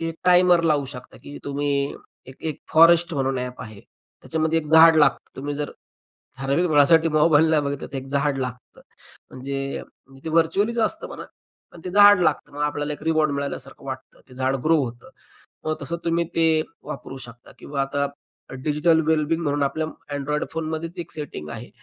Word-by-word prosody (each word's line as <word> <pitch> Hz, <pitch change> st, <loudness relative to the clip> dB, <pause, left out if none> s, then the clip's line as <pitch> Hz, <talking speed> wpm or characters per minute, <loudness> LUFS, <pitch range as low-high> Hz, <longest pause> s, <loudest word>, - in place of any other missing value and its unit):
एक 165 Hz, 0 st, -3 dB
टाइमर 180 Hz, -1 st, +5 dB
लावू 150 Hz, -3 st, +2 dB
शकता, 125 Hz, -2 st, -11 dB
की 145 Hz, -, -9 dB
तुम्ही 145 Hz, +1 st, -2 dB, 0.6 s
एक 130 Hz, -, -12 dB
एक 155 Hz, -, -5 dB
फॉरेस्ट 170 Hz, +1 st, +6 dB
म्हणून 135 Hz, -1 st, 0 dB
ॲप 125 Hz, 0 st, -5 dB
आहे. 110 Hz, -4 st, -11 dB, 0.4 s
त्याच्यामध्ये 160 Hz, 0 st, 0 dB
एक 155 Hz, -, -5 dB
झाड 160 Hz, +1 st, +7 dB
लागतं. 150 Hz, -, +2 dB
तुम्ही 145 Hz, +2 st, -4 dB
जर 145 Hz, 0 st, -3 dB, 0.7 s
ठराविक 140 Hz, +6 st, +1 dB
वेळेसाठी 160 Hz, +2 st, +5 dB
मोबाइल 155 Hz, 0 st, +4 dB
नाही 155 Hz, -2 st, +3 dB
बघितला 140 Hz, -1 st, -4 dB
1 130 Hz, -, -8 dB
झाड 140 Hz, 0 st, 0 dB
लागतं. 125 Hz, -1 st, -6 dB, 0.5 s
म्हणजे 135 Hz, +1 st, -4 dB, 0.4 s
ते -, -, -4 dB
व्हर्चुअलीच 180 Hz, +8 st, +1 dB
असतं 320 Hz, +9 st, 0 dB
म्हणा, -, -, -8 dB, 0.5 s
पण 170 Hz, -, -13 dB
ते 180 Hz, -, -4 dB
झाड 205 Hz, 0 st, +7 dB
लागतं. 155 Hz, -4 st, 0 dB
मग 145 Hz, -, -4 dB
आपल्याला 145 Hz, 0 st, -1 dB
1 150 Hz, -, -8 dB
रिवॉर्ड 155 Hz, -1 st, +2 dB
मिळाल्यासारखं 140 Hz, -1 st, -5 dB
वाटतं. 130 Hz, -1 st, -8 dB
ते 130 Hz, -, -15 dB
झाडं 130 Hz, 0 st, -1 dB
ग्रो 165 Hz, +1 st, +4 dB
होतं. 120 Hz, 0 st, -9 dB, 0.6 s
मग 155 Hz, 0 st, 0 dB
तसं 145 Hz, +4 st, -3 dB
तुम्ही 170 Hz, 0 st, +1 dB
ते 160 Hz, -1 st, +3 dB, 0.2 s
वापरू 135 Hz, 0 st, -7 dB
शकता 120 Hz, +1 st, -15 dB
किंवा 140 Hz, -1 st, -3 dB
आता 140 Hz, +1 st, -1 dB, 0.4 s
अ, -, -, -7 dB
डिजिटल 155 Hz, +2 st, +3 dB
वेल 160 Hz, -1 st, +3 dB
बिंग 165 Hz, +1 st, 0 dB
म्हणून 145 Hz, -1 st, 0 dB
आपल्या 150 Hz, +3 st, -1 dB, 0.3 s
अँन्ड्रॉइड 150 Hz, +1 st, -2 dB
फोनमध्येच 160 Hz, +1 st, -4 dB
1 170 Hz, -1 st, -6 dB
सेटिंग 145 Hz, -, -6 dB
आहे. 115 Hz, +6 st, -8 dB
150 Hz, 175 wpm, -23 LUFS, 135-165 Hz, 0.7 s, झाड